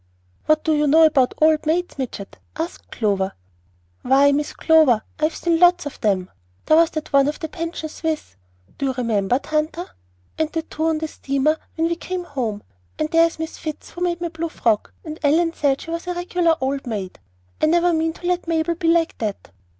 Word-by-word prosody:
"What 310 Hz, 0 st, +3 dB
do 315 Hz, -, +2 dB
you 300 Hz, 0 st, +2 dB
know 320 Hz, +3 st, +6 dB
about 275 Hz, -5 st, +3 dB
old 310 Hz, 0 st, +3 dB
maids, 345 Hz, -1 st, -1 dB
midget?" 230 Hz, -6 st, -6 dB, 0.2 s
asked 330 Hz, +2 st, -5 dB
Clover. 195 Hz, -4 st, -1 dB, 0.7 s
"Why, 275 Hz, +2 st, +4 dB
Miss 290 Hz, +1 st, 0 dB
Clover, 310 Hz, -9 st, +4 dB, 0.2 s
I 305 Hz, -, +3 dB
have 315 Hz, -, -1 dB
seen 335 Hz, -1 st, +1 dB
lots 355 Hz, -1 st, +5 dB
of 290 Hz, -, -7 dB
them. 190 Hz, -4 st, 0 dB, 0.3 s
There 310 Hz, -, +5 dB
was 330 Hz, 0 st, +5 dB
that 310 Hz, -2 st, -6 dB
one 275 Hz, 0 st, +5 dB
at 295 Hz, -, -1 dB
the 320 Hz, -, -5 dB
Pension 330 Hz, -1 st, -5 dB
Suisse; 315 Hz, -, -4 dB, 0.4 s
you 270 Hz, -1 st, 0 dB
remember, 230 Hz, -3 st, +1 dB
Tanta? 310 Hz, +4 st, -2 dB, 0.5 s
And 315 Hz, -1 st, 0 dB
the 325 Hz, -1 st, -2 dB
two 315 Hz, 0 st, -4 dB
on 320 Hz, -1 st, +1 dB
the 315 Hz, +1 st, -3 dB
steamer 275 Hz, +1 st, 0 dB, 0.2 s
when 325 Hz, 0 st, +1 dB
we 340 Hz, -, 0 dB
came 365 Hz, +1 st, -4 dB
home. 240 Hz, -10 st, -4 dB, 0.3 s
And 310 Hz, -, -1 dB
there's 330 Hz, 0 st, +3 dB
Miss 320 Hz, 0 st, -6 dB
Fitz 310 Hz, -2 st, -6 dB
who 350 Hz, -, -10 dB
made 350 Hz, -1 st, 0 dB
my 345 Hz, -, -2 dB
blue 330 Hz, 0 st, -4 dB
frock; 225 Hz, -8 st, 0 dB, 0.3 s
Ellen 325 Hz, +3 st, +2 dB
said 280 Hz, -3 st, +1 dB
she 330 Hz, -, -7 dB
was 335 Hz, +2 st, -4 dB
a 360 Hz, -, -2 dB
regular 350 Hz, -1 st, +1 dB
old 270 Hz, 0 st, -2 dB
maid. 200 Hz, -5 st, -5 dB, 0.4 s
I -, -, +4 dB
never 345 Hz, +2 st, +3 dB
mean 320 Hz, 0 st, 0 dB
to 350 Hz, -, -12 dB
let 355 Hz, -1 st, 0 dB
Mabel 330 Hz, 0 st, +1 dB
be 335 Hz, 0 st, -3 dB
like 330 Hz, 0 st, +2 dB
that." 210 Hz, -, -4 dB
315 Hz, 200 wpm, -21 LUFS, 275-335 Hz, 0.7 s, know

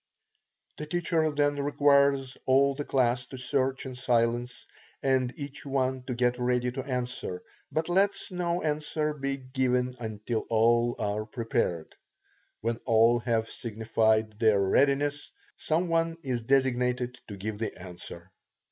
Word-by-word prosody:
The 150 Hz, -, -6 dB
teacher 165 Hz, -1 st, +1 dB
then 145 Hz, -1 st, +1 dB
requires 140 Hz, -2 st, +3 dB
all 135 Hz, +1 st, +4 dB
the 145 Hz, +2 st, -4 dB
class 125 Hz, -2 st, +1 dB
to 130 Hz, -, -9 dB
search 130 Hz, +1 st, -1 dB
in 130 Hz, -, -6 dB
silence, 120 Hz, 0 st, 0 dB, 0.4 s
and 130 Hz, -2 st, +2 dB
each 140 Hz, -1 st, -7 dB
one 130 Hz, -2 st, -1 dB
to 125 Hz, -, -3 dB
get 125 Hz, 0 st, +1 dB
ready 125 Hz, 0 st, +1 dB
to 130 Hz, +1 st, -4 dB
answer, 125 Hz, -8 st, -3 dB, 0.3 s
but 160 Hz, +1 st, -1 dB
lets 195 Hz, +3 st, +1 dB
no 175 Hz, -1 st, -1 dB
answer 150 Hz, 0 st, -1 dB
be 140 Hz, -1 st, -3 dB
given 130 Hz, -1 st, 0 dB
until 110 Hz, 0 st, -3 dB
all 120 Hz, +1 st, +3 dB
are 105 Hz, +1 st, -2 dB
prepared. 115 Hz, -, -2 dB, 0.7 s
When 115 Hz, +1 st, -1 dB
all 115 Hz, +1 st, +5 dB
have 115 Hz, -1 st, 0 dB
signified 110 Hz, -1 st, 0 dB
their 110 Hz, -3 st, +4 dB
readiness, 140 Hz, +8 st, +2 dB, 0.2 s
some 165 Hz, +3 st, 0 dB
one 165 Hz, 0 st, +1 dB
is 125 Hz, -3 st, -2 dB
designated 125 Hz, -1 st, +1 dB
to 100 Hz, -, -8 dB
give 105 Hz, +2 st, -5 dB
the 110 Hz, -3 st, -3 dB
answer. 90 Hz, 0 st, -9 dB
125 Hz, 140 wpm, -28 LUFS, 115-140 Hz, 0.7 s, all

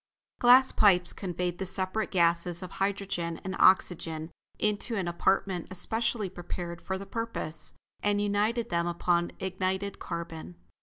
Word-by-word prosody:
Glass 255 Hz, +2 st, +7 dB
pipes 180 Hz, -4 st, +4 dB
conveyed 180 Hz, -2 st, -3 dB
the 190 Hz, -, -2 dB
separate 190 Hz, +4 st, -2 dB
gases 170 Hz, -1 st, +2 dB
of 185 Hz, -, -7 dB
hydrogen 195 Hz, -4 st, -2 dB
and 190 Hz, 0 st, -4 dB
oxygen 165 Hz, -3 st, +3 dB, 0.3 s
into 210 Hz, +2 st, 0 dB
an 190 Hz, -4 st, -1 dB
apartment 180 Hz, +1 st, 0 dB
especially 220 Hz, +3 st, -1 dB
prepared 175 Hz, -1 st, -6 dB
for 190 Hz, -, -3 dB
the 195 Hz, -, -7 dB
purpose, 230 Hz, -9 st, -3 dB, 0.3 s
and 205 Hz, 0 st, +1 dB
united 205 Hz, +3 st, 0 dB
them 170 Hz, 0 st, +1 dB
upon 175 Hz, 0 st, +1 dB
ignited 190 Hz, +1 st, -2 dB
carbon. 165 Hz, -, -6 dB
185 Hz, 135 wpm, -29 LUFS, 170-205 Hz, 0.3 s, Glass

